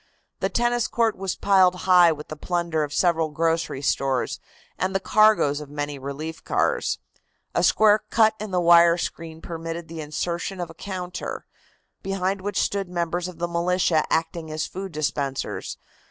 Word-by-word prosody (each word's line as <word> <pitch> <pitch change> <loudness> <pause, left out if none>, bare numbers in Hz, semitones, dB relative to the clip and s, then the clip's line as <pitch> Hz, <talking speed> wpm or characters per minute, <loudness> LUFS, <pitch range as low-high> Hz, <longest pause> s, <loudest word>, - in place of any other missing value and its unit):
The - - 0
tennis 240 0 +1
court 230 -2 +1
was 190 -1 -3
piled 190 -2 +4
high 180 -2 +7
with 150 -1 -6
the 155 - -5
plunder 170 0 -1
of 145 - -4
several 165 -1 +2
grocery 165 -2 -1
stores 135 -2 0 0.4
and 190 +1 -1
the - - +3
cargoes 205 -9 +3
of 150 - -9
many 145 -1 -4
relief 145 +4 -6
cars. - - 0 0.6
A - - +1
square 215 0 +5
cut 220 0 +4
in 215 0 -5
the 180 -1 0
wire 170 0 +6
screen 165 -1 -5
permitted 165 0 -5
of 160 - -24
the 165 -1 -6
insertion 170 +5 -3
of 175 -2 -4
a - - -12
counter, 180 0 -6 0.6
behind 195 0 -2
which 205 +1 -3
stood 195 -2 -1
members 175 0 -2
of 180 -2 -9
the 175 +1 -2
militia 170 -2 +1
acting 160 0 -1
as 155 0 -2
food 190 0 -6
dispensers. 145 -3 -3
170 Hz, 170 wpm, -24 LUFS, 160-190 Hz, 0.6 s, high